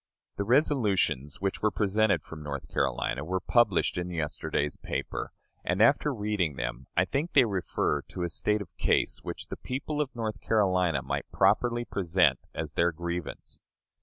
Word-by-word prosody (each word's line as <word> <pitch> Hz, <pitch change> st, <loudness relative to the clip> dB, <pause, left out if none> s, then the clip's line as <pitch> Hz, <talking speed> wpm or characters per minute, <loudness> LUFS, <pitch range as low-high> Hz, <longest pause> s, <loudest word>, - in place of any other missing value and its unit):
The 100 Hz, -, 0 dB
resolutions 100 Hz, -, +2 dB
which 95 Hz, -1 st, -1 dB
were 110 Hz, -, +3 dB
presented 105 Hz, +1 st, +2 dB
from 80 Hz, -1 st, -9 dB
North 70 Hz, -2 st, -5 dB
Carolina 65 Hz, +5 st, -1 dB
were 95 Hz, +4 st, -1 dB
published 105 Hz, -5 st, +2 dB
in 90 Hz, 0 st, -3 dB
yesterday's 75 Hz, -3 st, -2 dB
paper, -, -, -4 dB, 0.3 s
and, 90 Hz, +2 st, -1 dB
after 140 Hz, +6 st, +4 dB
reading 105 Hz, -, -1 dB
them, 65 Hz, 0 st, -4 dB
I 90 Hz, -, +5 dB
think 145 Hz, -, -2 dB
they -, -, +7 dB
refer 95 Hz, -5 st, 0 dB
to 90 Hz, -, -6 dB
a 85 Hz, -, -1 dB
state 105 Hz, +5 st, 0 dB
of -, -, -21 dB
case -, -, +2 dB
which -, -, -6 dB
the -, -, -5 dB
people 145 Hz, +3 st, -3 dB
of 135 Hz, -4 st, -4 dB
North 110 Hz, -2 st, -3 dB
Carolina 90 Hz, -, +2 dB
might 65 Hz, -, -3 dB
properly 120 Hz, -1 st, +2 dB
present 90 Hz, -3 st, +2 dB, 0.2 s
as -, -, -4 dB
their 85 Hz, +1 st, +3 dB
grievance. 85 Hz, 0 st, -5 dB
95 Hz, 165 wpm, -29 LUFS, 85-110 Hz, 0.3 s, they